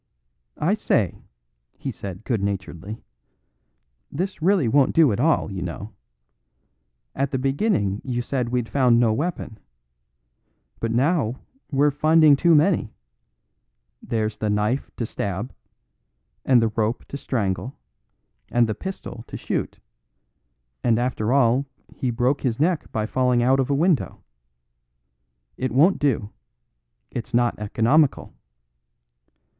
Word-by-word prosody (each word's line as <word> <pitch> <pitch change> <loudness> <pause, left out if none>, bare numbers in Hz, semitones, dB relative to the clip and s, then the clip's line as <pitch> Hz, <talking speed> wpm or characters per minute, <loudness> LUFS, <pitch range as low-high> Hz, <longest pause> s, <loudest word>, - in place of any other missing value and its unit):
"I - - +1
say," - - 0 0.6
he - - -4
said 95 +1 -8
good 115 -5 -1
naturedly, 100 +1 -5 1.1
"this 185 +3 -4
really 180 -5 +3
won't 135 +3 +3
do 160 -6 +5
at 105 - -2
all, 150 -6 +2
you 95 -1 -5
know. 100 +5 -6 1.2
At 140 +1 -1
the 130 - -2
beginning 135 - 0
you 120 -2 -2
said 125 -2 -2
we'd 125 -1 -1
found 125 -3 +3
no 115 -2 +3
weapon. 135 -5 -4 1.2
But 115 - -2
now 130 0 +1 0.4
we're 145 +1 +3
finding 155 +1 +5
too 170 +3 +4
many; 155 - +2 1.1
there's 110 -2 -2
the 105 - -2
knife 105 +6 0
to 120 - -2
stab, 105 +3 -4 0.9
and 125 -3 +4
the 115 - +2
rope 110 +2 -2
to - - -6
strangle, 125 0 -2 0.7
and 120 -1 +3
the 110 - -1
pistol 155 - -7
to - - -7
shoot; - - -3 1.1
and 115 -2 +3
after 120 -2 -1
all 135 0 +3 0.3
he 130 - -2
broke 125 +4 0
his 125 -2 -1
neck 165 +1 0
by 110 -1 -1
falling 125 +1 +1
out 130 +2 +3
of 135 0 0
a 140 - +2
window! 165 -1 0 1.3
It 130 -2 -2
won't 155 +10 +4
do. 115 -7 0 0.8
It's 120 +1 -4
not 120 -2 +1
economical." 115 +8 +1
125 Hz, 130 wpm, -23 LUFS, 110-140 Hz, 1.3 s, do